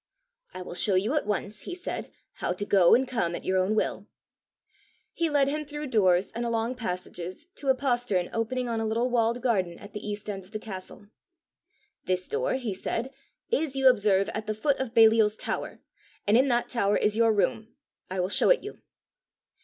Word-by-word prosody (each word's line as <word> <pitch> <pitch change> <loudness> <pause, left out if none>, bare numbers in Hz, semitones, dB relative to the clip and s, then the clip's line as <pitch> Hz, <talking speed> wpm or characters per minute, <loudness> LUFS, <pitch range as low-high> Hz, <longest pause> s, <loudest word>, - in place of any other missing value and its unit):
"I 185 - -7
will 180 - -8
show 190 +2 +1
you 205 +8 +1
at 300 -8 0
once," 210 0 -2
he 360 - -5
said, 365 - -5 0.3
"how - - -1
to 205 +3 -4
go 190 -4 +6
and 260 +2 +1
come 225 -9 -1
at - - -8
your 185 0 +2
own 190 +4 +1
will." - - -1 1.1
He 335 -1 0
led 285 -2 +3
him 305 +2 -1
through 295 -1 -6
doors 185 -4 +3
and 235 - -4
along 230 +1 -1
passages 180 - -5
to 280 - -5
a 265 - +5
postern 245 -9 0
opening 245 +2 -1
on 230 -1 -1
a - - -1
little 235 +3 0
walled 235 0 +1
garden 190 -9 0
at 205 0 -13
the 210 - -4
east 210 0 -5
end 195 -2 -4
of 190 +4 -21
the - - -1
castle. 205 -1 -9 1.0
"This 185 0 -1
door," 465 +4 -1
he 245 -6 -3
said, 230 +7 -3 0.4
"is, 320 - 0
you 270 -1 +4
observe, 205 -5 +3
at 215 0 -5
the 215 - -1
foot 280 +6 0
of 255 -3 -4
Baliol's 220 -2 +6
tower, - - -4 0.4
and 205 - +3
in 260 +3 +5
that 240 -2 +1
tower 205 -4 +1
is 210 0 +1
your 225 0 +4
room; 220 +2 -1 0.3
I 185 0 -1
will 180 - 0
show - - +3
it - - +4
you." 415 - -8
225 Hz, 200 wpm, -27 LUFS, 195-255 Hz, 1.1 s, go